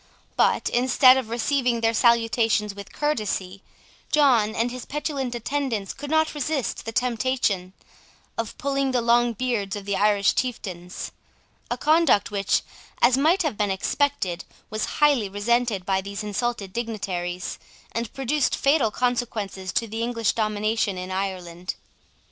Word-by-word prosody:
But, - - +2
instead 255 +1 +6
of 255 -4 -3
receiving 240 0 0
their 225 0 +2
salutations 225 -2 +2
with 200 0 -10
courtesy, 205 -9 -2 0.5
John 245 -8 +4
and 235 +2 0
his 250 0 -6
petulant 275 -4 -3
attendants 240 -5 -2
could 285 +1 -8
not 315 0 +2
resist 295 -2 -2
the 225 - -3
temptation 230 -6 0 0.6
of 230 -1 -4
pulling 275 -1 0
the 250 - +3
long 240 0 +3
beards 225 -4 -2
of 205 -1 -7
the 200 -1 -1
Irish 205 -1 +3
chieftains; 185 -8 -4 0.6
a - - -1
conduct 310 -10 +3
which, 200 -1 +1 0.4
as 240 +1 +5
might 325 +8 +3
have 295 -10 -2
been 210 -2 +1
expected, 190 -2 0 0.3
was 215 0 -1
highly 285 -9 +3
resented 210 -1 0
by 190 0 +1
these 200 +2 -6
insulted 210 -1 -2
dignitaries, 185 -6 -3 0.3
and 230 -1 -3
produced 275 +2 0
fatal 275 -4 +3
consequences 220 -6 -2
to 230 - 0
the 225 +1 -4
English 230 -2 0
domination 215 -2 0
in 180 +1 -5
Ireland. 185 -2 -4
230 Hz, 140 wpm, -24 LUFS, 200-255 Hz, 0.6 s, instead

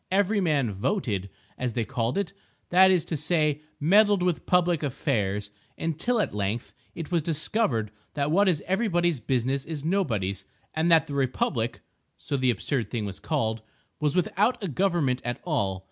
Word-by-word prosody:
Every 200 +2 +2
man 145 - +1
"voted," 100 - -1 0.3
as 125 -2 -1
they 115 -1 -1
called 125 - -1
it—that 190 -1 +2
is 180 -3 +3
to 170 - -2
say 150 -1 +1 0.2
meddled 200 +4 +4
with 180 -3 -1
public 175 -3 +3
affairs—until 135 - -2
at 210 - 0
length, 105 +3 -2 0.2
it 165 0 -6
was 170 -2 +2
discovered 150 - 0 0.2
that 145 0 0
what 195 +3 +4
is 160 -5 0
everybody's 175 - +1
business 130 +3 0
is 155 -3 -6
nobody's, 105 - 0 0.3
and 160 +2 +1
that 165 -1 +6
the 145 - -7
"Republic" 125 -3 -1 0.4
(so 145 - -4
the 130 -2 +2
absurd 120 +2 -1
thing 115 -4 -2
was 100 -1 -6
called) 115 -8 -1 0.4
was 150 0 0
without 210 +6 +1
a - - 0
government 160 -6 +1
at 120 0 -3
all. 100 - -1
150 Hz, 160 wpm, -27 LUFS, 120-180 Hz, 0.4 s, that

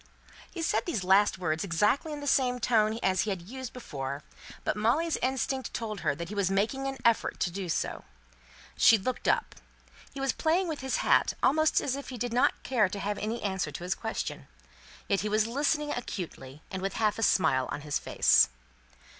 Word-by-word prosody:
He 335 - -5
said 325 - 0
these 225 - -1
last 190 +2 +4
words 160 -3 -1
exactly 210 - +1
in 295 -1 -5
the - - -6
same 255 -3 +2
tone 220 -2 +2
as 185 -1 +2
he 215 - -2
had 190 -4 -3
used 255 +6 -7
before; 140 - -6 0.4
but - - 0
Molly's 275 +11 +1
instinct 265 0 -2
told 215 -3 -4
her 150 -5 0
that 170 +2 -6
he - - -6
was 200 -3 +1
making 220 +8 0
an 270 0 -4
effort 230 -1 +2
to 175 - +1
do 190 0 -5
so. - - -2 0.7
She 225 - +6
looked 250 +5 -3
up. - - +1 0.6
He 275 - -8
was 270 -1 0
playing 345 +4 +1
with 315 -3 -3
his 265 0 -1
hat, - - +3
almost 310 +2 +4
as 265 - -1
if 280 - -7
he 255 - -6
did 240 0 -3
not 245 - +2
care 245 -6 +2
to 200 - -5
have 205 +1 -2
any 225 +3 -3
answer 190 -6 -1
to 145 - -7
his 180 +1 0
question. - - -5 0.6
Yet 200 - +2
he 210 - -2
was 215 +1 +2
listening 295 +5 0
acutely, 155 - -6
and 190 - -4
with 195 0 -3
a - - -4
half 215 -2 +1
smile 130 -11 +3
on - - -4
his 150 0 -2
face. - - +4
215 Hz, 205 wpm, -29 LUFS, 185-265 Hz, 0.7 s, She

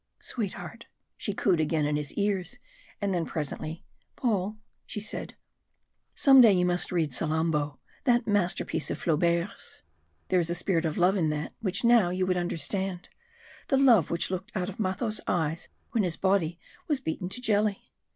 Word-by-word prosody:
"Sweetheart!" 210 0 -5 0.3
she 205 - -3
cooed 190 -3 +1
again 155 -1 +1
in 150 0 0
his 150 -1 -3
ears; 200 -3 -1 0.4
and 200 -2 -1
then 175 -2 0
presently, 155 +1 -5 0.3
"Paul," 215 -3 -1 0.3
she - - -4
said, 210 - -4 0.8
"some 270 -2 +7
day 230 -3 +8
you 180 -1 +2
must 180 0 +2
read 160 -6 0
'Salammbo,' 155 0 0 0.3
that 240 -2 +3
masterpiece 180 -6 +1
of - - -2
Flaubert's. 170 +3 -1 0.5
There 185 - +3
is 170 -1 0
a 170 - +1
spirit 175 -1 0
of 155 -1 -2
love 185 +3 +3
in 160 -4 +1
that 150 0 -3
which 200 -3 0
now 235 -6 +5
you 185 +1 0
would 185 0 +1
understand 180 +2 -2 0.6
the 270 - +2
love 240 - +5
which 170 +2 0
looked 190 +5 -4
out 185 -1 -1
of 200 - -9
Matho's 215 +3 -1
eyes 165 -1 -1 0.2
when 230 - +1
his 175 -4 -1
body 190 -4 +1 0.3
was 295 -4 +1
beaten 180 -3 -4
to 250 - -3
jelly. 210 -4 +1
180 Hz, 170 wpm, -28 LUFS, 165-205 Hz, 0.8 s, day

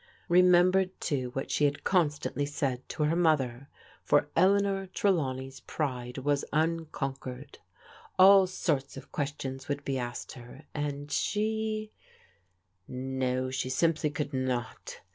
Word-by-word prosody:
Remembered, 180 +1 +4
too, 130 -5 -1
what 135 - -4
she 150 - +2
had 145 0 -1
constantly 150 -5 +1
said 130 -3 -3
to 150 - -2
her 155 +2 +2
mother, 140 -6 +1 0.3
for 145 0 +2
Eleanor 195 +1 +3
Trelawney's 135 -10 -1
pride 125 -4 -4
was 140 +1 0
unconquered. 145 -4 -3 0.6
All 190 0 +8
sorts 145 -7 -2
of - - -11
questions 135 -3 -4
would 145 0 -3
be 135 -1 -1
asked 120 -1 -5
her, 125 +4 -12
and 145 -1 -4
she 215 0 -1 1.0
No, 130 0 -2
she 130 0 -2
simply 155 +3 +1
could 150 -2 -4
not. 130 -3 -3
145 Hz, 125 wpm, -29 LUFS, 130-175 Hz, 1.0 s, All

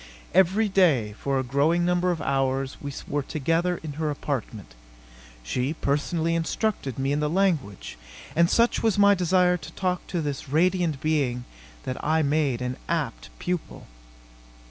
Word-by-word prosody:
Every 190 +5 +4
day, 155 - +3
for 135 -1 0
a 130 - 0
growing 145 +7 +2
number 180 +1 +2
of 165 -4 -1
hours, 135 0 0
we 140 - -5 0.2
were 145 - -1
together 165 +5 0
in 155 -2 -5
her 155 - 0
apartment. 115 - -4 0.7
She 125 - -2
personally 160 +4 0
instructed 165 - -1
me 135 +1 0
in 145 - +1
the 150 0 0
language, 155 - -1 0.4
and 170 +1 +4
such 235 +1 +3
was 220 -3 +2
my 200 0 +6
desire 180 -1 +3
to - - -10
talk 180 -1 -2
to 175 - -2
this 145 -4 -4
radiant 170 -1 +1
being 135 -6 0 0.4
that 130 - -5
I 160 +1 +2
made 140 -4 +1
an 125 +1 -3
apt 155 -8 -2
pupil. 180 -2 -4
155 Hz, 155 wpm, -25 LUFS, 135-180 Hz, 0.7 s, my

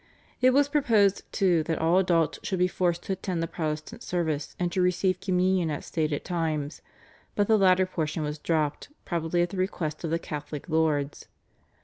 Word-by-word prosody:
It 255 - +6
was 280 +2 +4
proposed 225 -9 +2
too 180 -4 +3
that 160 - -1
all 165 +3 +3
adults 170 -4 +1
should 190 - -2
be 180 0 +3
forced 175 -1 -1
to 195 - -2
attend 185 -3 -3
the - - -1
Protestant 155 +8 -4
service 160 -6 -2
and 175 -1 -1
to 185 - 0
receive 180 +1 +1
Communion 185 -2 +1
at 150 - -3
stated 155 -3 -2
times, 160 -4 -2 0.5
but 205 - +3
the 220 - +5
latter 185 -2 +4
portion 160 -3 -2
was 150 0 -4
dropped 155 - -1 0.2
probably 170 0 0
at 175 - -3
the 195 - -6
request 175 -5 -2
of 165 - -2
the 165 - +1
Catholic 150 -3 -6
lords. 155 -3 0
175 Hz, 185 wpm, -27 LUFS, 155-185 Hz, 0.5 s, It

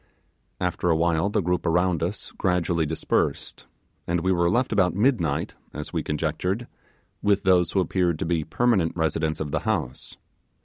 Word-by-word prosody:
After 90 - -1
a 80 - +4
while 85 +3 +1
the 105 0 +1
group 90 +1 0
around 90 0 +1
us 90 +5 -3
gradually 85 -3 0
dispersed, 80 +1 -2 0.4
and 85 0 0
we 95 +2 +1
were 85 -1 +2
left 120 +5 +1
about 95 -4 +2
midnight 100 - +1 0.2
(as 75 0 -6
we - - 0
conjectured) 90 +8 -2 0.6
with 100 -1 +2
those 90 -3 +3
who 95 - +2
appeared 90 -2 +1
to - - -3
be 80 -2 0
permanent 95 -1 +1
residents 80 -1 0
of 75 -2 -3
the - - 0
house. 90 - -3
90 Hz, 165 wpm, -25 LUFS, 80-95 Hz, 0.6 s, a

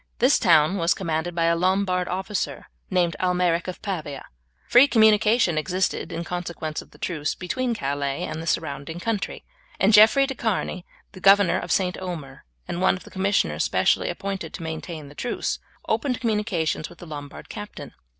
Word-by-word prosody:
This 255 +5 +4
town 165 -2 +4
was 170 -1 +2
commanded 165 -1 -2
by 170 - +1
a 165 0 +3
Lombard 185 +1 +1
officer 190 +3 -3 0.2
named 180 -3 +1
Almeric 180 -2 +1
of 185 - -7
Pavia. 155 -8 -4 0.4
Free 250 +4 +7
communication 220 - +4
existed, 185 +4 -1
in 170 - -3
consequence 170 -3 -4
of - - -17
the - - -19
truce, 155 -4 -2
between 240 +6 -2
Calais 140 -3 -2
and 155 +1 -4
the 165 - -7
surrounding 155 0 -2
country, 215 0 -3 0.3
and 200 +3 +4
Jeffrey 220 +6 +7
de 270 - -3
Charny, 200 -6 -2 0.2
the 185 - -12
governor 195 -1 +5
of - - -5
St. 180 -2 +1
Omer, 160 - -7 0.2
and 175 - -3
one - - +4
of - - -14
the - - -14
commissioners 190 - +1
especially - - +2
appointed 195 0 -4
to 170 - -7
maintain 160 -1 -6
the 145 - -12
truce, 240 +11 -2 0.3
opened 255 -4 0
communications 210 -9 -1
with 175 - -15
the 175 - -11
Lombard 145 -3 -8
captain. 210 -1 -8
180 Hz, 170 wpm, -24 LUFS, 160-200 Hz, 0.4 s, Free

